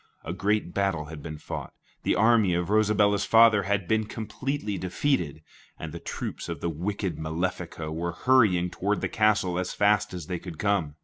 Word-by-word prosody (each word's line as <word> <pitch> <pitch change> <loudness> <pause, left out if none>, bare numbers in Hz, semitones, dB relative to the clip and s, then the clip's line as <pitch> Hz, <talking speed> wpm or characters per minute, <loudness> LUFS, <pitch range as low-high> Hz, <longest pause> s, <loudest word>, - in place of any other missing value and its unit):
A 85 - -4
great 100 -1 0
battle 95 -6 0
had 75 -1 -9
been 75 0 -7
fought, - - -7 0.3
the - - +1
army 110 -3 +4
of 90 +2 -1
Rosabella's 105 -1 +3
father 115 -2 +6
had 100 -4 0
been 110 +2 +1
completely 110 +1 -4
defeated, 90 - -1 0.3
and 80 - -6
the 85 - -6
troops - - -5
of 85 -3 -4
the 85 - -2
wicked 90 +1 -3
Malefico 80 0 -3
were 85 +1 -3
hurrying 95 -7 +3
toward 105 +2 -1
the - - 0
castle 100 -4 +2
as 90 - -3
fast 105 0 +3
as 90 -4 -6
they 90 +1 -4
could 85 -3 -9
come. 95 -8 0
95 Hz, 180 wpm, -27 LUFS, 85-105 Hz, 0.3 s, father